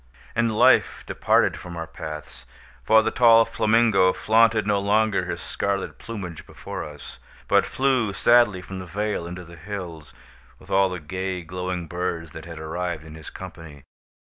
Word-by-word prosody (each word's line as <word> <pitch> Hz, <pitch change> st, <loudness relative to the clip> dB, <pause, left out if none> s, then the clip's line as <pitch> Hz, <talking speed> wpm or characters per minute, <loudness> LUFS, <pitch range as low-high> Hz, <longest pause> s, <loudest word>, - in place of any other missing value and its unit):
And 115 Hz, -2 st, 0 dB
Life -, -, +4 dB
departed -, -, +2 dB
from 85 Hz, -1 st, -9 dB
our 80 Hz, -, -4 dB
paths; 75 Hz, -2 st, -9 dB, 0.4 s
for 110 Hz, 0 st, +5 dB
the 110 Hz, -, 0 dB
tall 115 Hz, -2 st, +6 dB
flamingo 110 Hz, -4 st, +3 dB
flaunted 110 Hz, -1 st, +3 dB
no 100 Hz, -1 st, +2 dB
longer 105 Hz, +1 st, +2 dB
his -, -, -4 dB
scarlet 100 Hz, -1 st, -3 dB
plumage 95 Hz, -8 st, -7 dB
before -, -, -7 dB
us, 75 Hz, -3 st, -10 dB, 0.3 s
but -, -, +3 dB
flew 130 Hz, -5 st, +1 dB
sadly 105 Hz, -3 st, +3 dB
from 95 Hz, +1 st, -7 dB
the 95 Hz, -, -8 dB
vale 100 Hz, -1 st, -2 dB
into 90 Hz, +1 st, -7 dB
the 85 Hz, +1 st, -13 dB
hills, 85 Hz, -4 st, -7 dB, 0.5 s
with -, -, -15 dB
all 95 Hz, 0 st, +4 dB
the 90 Hz, -1 st, -5 dB
gay 95 Hz, +3 st, -4 dB
glowing 90 Hz, +1 st, -4 dB
birds 85 Hz, -1 st, -4 dB
that 80 Hz, -, -9 dB
had 85 Hz, -1 st, -9 dB
arrived 80 Hz, +1 st, -4 dB
in 80 Hz, -, -11 dB
his 80 Hz, -1 st, -10 dB
company. 80 Hz, -6 st, -10 dB
95 Hz, 165 wpm, -24 LUFS, 85-110 Hz, 0.5 s, tall